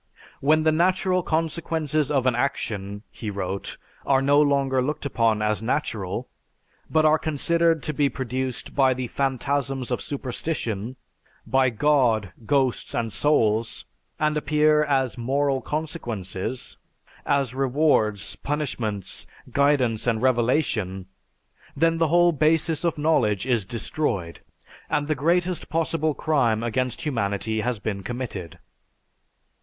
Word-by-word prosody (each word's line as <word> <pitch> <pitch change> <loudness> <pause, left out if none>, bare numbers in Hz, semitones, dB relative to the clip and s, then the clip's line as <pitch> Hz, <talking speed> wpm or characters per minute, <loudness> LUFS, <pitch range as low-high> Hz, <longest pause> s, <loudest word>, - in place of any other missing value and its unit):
"When 155 +3 +3
the 155 - +4
natural 185 +3 +2
consequences 160 -2 -1
of 135 -3 +1
an 130 - +3
action," 105 -5 -2
he 110 - -6
wrote, 100 -1 -4 0.3
"are 135 -1 +3
no 140 +2 +4
longer 140 -2 +2
looked 150 +3 -2
upon 115 -5 +1
as 105 0 0
natural, 110 -6 -2 0.6
but 155 -1 +3
are 155 0 +5
considered 165 +1 +1
to 155 - -2
be 145 -1 +2
produced 130 +2 -4
by 130 -2 +3
the 130 0 -3
phantasms 135 +1 -1
of 125 - -1
superstition, 125 -4 -3 0.5
by 130 -1 +3
'God,' 120 - +2 0.2
'Ghosts,' 135 -4 +1
and 115 -2 -2
'Souls,' 115 -7 +1 0.3
and 150 0 +1
appear 150 +1 +3
as 135 -4 0
'moral' 135 +2 0
consequences, 120 - -4 0.5
as 140 -4 +1
rewards, 130 -6 +1
punishments, 120 - -3 0.2
guidance 130 -5 +2
and 115 -1 +1
revelation, 115 - +1 0.7
then 165 +2 +2
the 165 - +3
whole 175 +2 +4
basis 155 +1 +1
of 170 -2 0
knowledge 135 - +2
is 120 -6 +1
destroyed; 100 - -2 0.5
and 145 0 0
the 155 - +2
greatest 170 +5 0
possible 160 -2 0
crime 120 -8 +1
against 125 +1 -2
humanity 110 -5 -1
has 125 +1 -1
been 105 -1 -4
committed." 95 -8 -5
135 Hz, 125 wpm, -24 LUFS, 115-150 Hz, 0.7 s, are